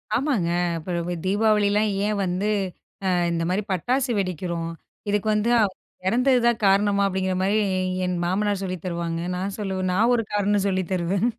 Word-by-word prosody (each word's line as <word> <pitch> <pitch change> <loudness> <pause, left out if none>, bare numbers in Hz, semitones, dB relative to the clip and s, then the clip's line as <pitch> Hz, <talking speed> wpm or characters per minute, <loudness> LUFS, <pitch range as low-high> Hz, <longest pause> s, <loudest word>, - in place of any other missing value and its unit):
ஆமாங்க. 245 - +1 0.3
இப்போ 170 +1 -3
தீபாவளிலாம் 210 +1 +2 0.2
ஏன் 210 0 0
வந்து, 185 +3 -1 0.6
அ - - +3 0.2
இந்த 165 0 -1
மாரி 190 +4 0
பட்டாசு 250 - 0
வெடிக்கிறோம், 170 -2 -2 0.4
இதுக்கு 210 +1 0
வந்து 215 +3 +1 0.6
இறந்தது 250 +4 +3
தான் 235 -1 +3
காரணமா, 200 +1 +3
அப்படிங்கிற 190 -1 -1
மாரி 195 +2 +1 0.5
என் 180 - -1
மாமனார் 200 +2 0
சொல்லித் 185 -3 -4
தருவாங்க, 170 -1 -2 0.2
நான் 195 +2 -3
சொல்லுவேன். 190 -2 -2
நான் 225 +6 +3
ஒரு 235 - +1
காரணம் 205 -1 +1
சொல்லி 190 -1 +1
தருவேன். 185 +3 0
195 Hz, 150 wpm, -24 LUFS, 180-210 Hz, 0.6 s, அ